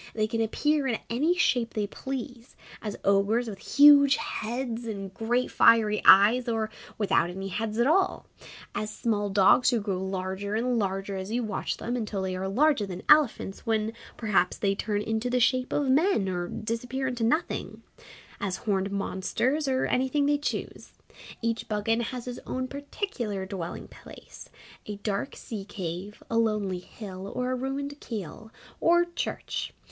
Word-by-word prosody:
They 215 Hz, -1 st, +1 dB
can 225 Hz, +1 st, -2 dB
appear 290 Hz, +6 st, +1 dB
in 235 Hz, -4 st, 0 dB
any 300 Hz, +9 st, +2 dB
shape 245 Hz, -9 st, +1 dB
they 210 Hz, -2 st, 0 dB
please 250 Hz, +1 st, -7 dB, 0.3 s
as 210 Hz, -2 st, -5 dB
ogres 200 Hz, +5 st, +3 dB
with 200 Hz, -3 st, -6 dB, 0.2 s
huge 285 Hz, -1 st, +8 dB
heads 235 Hz, 0 st, -4 dB
and 195 Hz, -3 st, -5 dB
great 240 Hz, +4 st, 0 dB
fiery 215 Hz, -2 st, +5 dB
eyes, 225 Hz, +6 st, +7 dB
or 220 Hz, -2 st, -1 dB, 0.3 s
without 195 Hz, -5 st, +2 dB
any 195 Hz, +2 st, -5 dB
heads 215 Hz, +3 st, -3 dB
at 235 Hz, -, +3 dB
all; 375 Hz, +6 st, +2 dB, 0.5 s
as 215 Hz, -, -3 dB
small 210 Hz, -2 st, -1 dB
dogs 195 Hz, +5 st, +5 dB
who 240 Hz, -2 st, +2 dB
grow 195 Hz, -3 st, -2 dB
larger 190 Hz, +2 st, -3 dB
and 240 Hz, +1 st, +1 dB
larger 195 Hz, 0 st, -2 dB
as 190 Hz, +1 st, -5 dB
you 240 Hz, +1 st, 0 dB
watch 215 Hz, -3 st, -3 dB
them 240 Hz, +2 st, -3 dB
until 215 Hz, -5 st, -3 dB
they 185 Hz, -1 st, -2 dB
are 190 Hz, +1 st, -3 dB
larger 250 Hz, +1 st, +2 dB
than 185 Hz, 0 st, -7 dB
elephants, 290 Hz, -10 st, +3 dB
when 220 Hz, 0 st, 0 dB, 0.2 s
perhaps 205 Hz, -5 st, +1 dB
they 195 Hz, -1 st, +1 dB
turn 205 Hz, +1 st, -2 dB
into 225 Hz, +3 st, -1 dB
the 250 Hz, 0 st, +1 dB
shape 255 Hz, +1 st, +2 dB
of 290 Hz, -, 0 dB
men 300 Hz, -, +3 dB
or 175 Hz, -1 st, -2 dB
disappear 240 Hz, +7 st, -3 dB
into 245 Hz, -2 st, -2 dB
nothing; 310 Hz, +9 st, -1 dB, 0.6 s
as 195 Hz, -2 st, -2 dB
horned 195 Hz, -2 st, -1 dB
monsters 235 Hz, +9 st, -1 dB
or 260 Hz, -1 st, +1 dB
anything 265 Hz, +3 st, +1 dB
they 290 Hz, 0 st, +2 dB
choose. 295 Hz, -, -4 dB, 0.5 s
Each 230 Hz, 0 st, -2 dB
Buggane 225 Hz, +2 st, 0 dB
has 250 Hz, 0 st, -5 dB
his 250 Hz, -1 st, -6 dB
own 255 Hz, 0 st, -2 dB
particular 275 Hz, -, -4 dB
dwelling 185 Hz, -3 st, -6 dB
place -, -, -13 dB, 0.4 s
a 210 Hz, -, -4 dB
dark 205 Hz, +5 st, -3 dB
sea 220 Hz, -6 st, -6 dB
cave, 190 Hz, 0 st, -6 dB
a 230 Hz, -, +1 dB
lonely 210 Hz, -5 st, 0 dB
hill, 190 Hz, 0 st, -9 dB
or 250 Hz, 0 st, -1 dB
a -, -, 0 dB
ruined 280 Hz, +3 st, -4 dB
Keeill, 215 Hz, -1 st, -7 dB, 0.3 s
or 345 Hz, +1 st, +4 dB
Church. 345 Hz, -, -4 dB
225 Hz, 165 wpm, -27 LUFS, 200-255 Hz, 0.6 s, huge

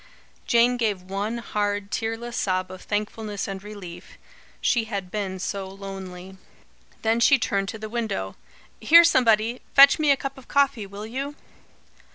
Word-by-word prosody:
Jane 240 Hz, +1 st, +4 dB
gave 210 Hz, -6 st, -1 dB
one 200 Hz, +5 st, -3 dB
hard, 205 Hz, -3 st, -2 dB
tearless 225 Hz, +1 st, -3 dB
sob 185 Hz, -1 st, -1 dB
of 185 Hz, -, -10 dB
thankfulness 210 Hz, 0 st, -3 dB
and 195 Hz, -1 st, -5 dB
relief. 200 Hz, -5 st, -10 dB, 0.4 s
She 235 Hz, -2 st, +1 dB
had 200 Hz, -4 st, -5 dB
been 195 Hz, -3 st, -3 dB
so 195 Hz, +1 st, -4 dB
lonely. 190 Hz, -1 st, -9 dB, 0.7 s
Then 225 Hz, +1 st, +2 dB
she 275 Hz, +4 st, +5 dB
turned 200 Hz, -4 st, -1 dB
to 220 Hz, -, -6 dB
the 220 Hz, 0 st, -6 dB
window. 215 Hz, -, -3 dB, 0.4 s
"Here, 335 Hz, +10 st, +8 dB
somebody! 235 Hz, -5 st, +3 dB
Fetch 280 Hz, +3 st, +8 dB
me 305 Hz, -1 st, +2 dB
a 280 Hz, -, +5 dB
cup 275 Hz, 0 st, -6 dB
of 260 Hz, -, -17 dB
coffee, 275 Hz, -7 st, +1 dB
will 200 Hz, +2 st, -8 dB
you?" 275 Hz, +6 st, -5 dB
215 Hz, 155 wpm, -24 LUFS, 195-235 Hz, 0.7 s, Here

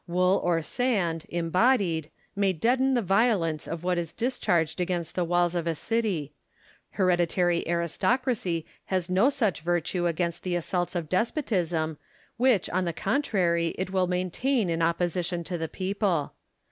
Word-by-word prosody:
Wool 180 Hz, +2 st, +2 dB
or 170 Hz, -2 st, +1 dB
sand, 185 Hz, -8 st, 0 dB
embodied, 175 Hz, -, +1 dB, 0.3 s
may 200 Hz, -1 st, +2 dB
deaden 255 Hz, +9 st, +2 dB
the 240 Hz, -, +1 dB
violence 190 Hz, -6 st, +1 dB
of 165 Hz, 0 st, -5 dB
what 180 Hz, -1 st, +1 dB
is 170 Hz, -2 st, -5 dB
discharged 180 Hz, -9 st, 0 dB
against 175 Hz, -2 st, -2 dB
the 180 Hz, -, 0 dB
walls 175 Hz, 0 st, +1 dB
of 170 Hz, -1 st, -2 dB
a 165 Hz, -, 0 dB
city: 195 Hz, -8 st, -1 dB, 0.6 s
hereditary 175 Hz, -2 st, +2 dB
aristocracy 175 Hz, -, 0 dB, 0.2 s
hath 185 Hz, -1 st, -1 dB
no 195 Hz, +9 st, +4 dB
such 220 Hz, -, 0 dB
virtue 175 Hz, +1 st, 0 dB
against 170 Hz, 0 st, -2 dB
tlie 180 Hz, -1 st, 0 dB
assaults 175 Hz, +1 st, -2 dB
of 170 Hz, -3 st, -2 dB
despotism, 175 Hz, -, -1 dB, 0.4 s
which 240 Hz, -6 st, +3 dB
on 185 Hz, +1 st, 0 dB
the 170 Hz, -, -2 dB
contrary 170 Hz, -, 0 dB
it 185 Hz, 0 st, -3 dB
will 185 Hz, -1 st, +1 dB
maintain 185 Hz, +5 st, 0 dB
in 165 Hz, 0 st, -1 dB
opposition 170 Hz, +1 st, 0 dB
to 175 Hz, -, -4 dB
the 165 Hz, -2 st, -3 dB
people. 190 Hz, -5 st, -1 dB
180 Hz, 145 wpm, -27 LUFS, 170-200 Hz, 0.6 s, no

